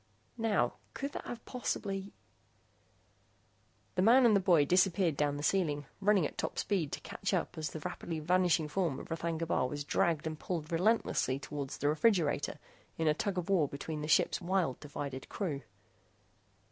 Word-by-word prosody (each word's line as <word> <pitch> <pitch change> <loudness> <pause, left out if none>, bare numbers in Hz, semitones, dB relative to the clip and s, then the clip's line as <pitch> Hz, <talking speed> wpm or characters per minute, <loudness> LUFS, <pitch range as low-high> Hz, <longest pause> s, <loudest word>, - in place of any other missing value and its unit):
Now, 205 - +1 0.2
could 280 +1 -3
that - - -6
have 235 -1 -7
possibly...? 200 -5 -3 1.8
The 185 - +1
man 240 +6 +6
and 220 -3 +6
the - - +5
boy 175 -6 +4
disappeared 180 0 +3
down 145 0 0
the 145 - -5
ceiling, 150 -5 +1
running 200 -4 +3
at - - -5
top - - -3
speed 180 -8 0
to - - -2
catch - - -2
up - - -2
as 155 -2 -3
the 155 - -7
rapidly 165 +2 -4
vanishing 175 -1 +2
form 165 -3 -1
of - - -10
R'thagna 165 0 -2
Bar 145 -5 +1
was 145 +2 -4
dragged 160 +2 +1
and 155 -1 -4
pulled 165 -3 -4
relentlessly 170 - +2
toward 140 0 -5
the 145 - -2
refrigerator 155 -3 +2 0.4
in 160 - 0
a 155 - +5
tug 195 +4 -2
of 180 - -2
war 180 -7 +3
between 150 +2 -5
the 150 - -3
ship's 160 - +3
wild, 175 -7 0
divided 140 -2 -6
crew. 155 -9 -3
165 Hz, 170 wpm, -32 LUFS, 150-195 Hz, 1.8 s, man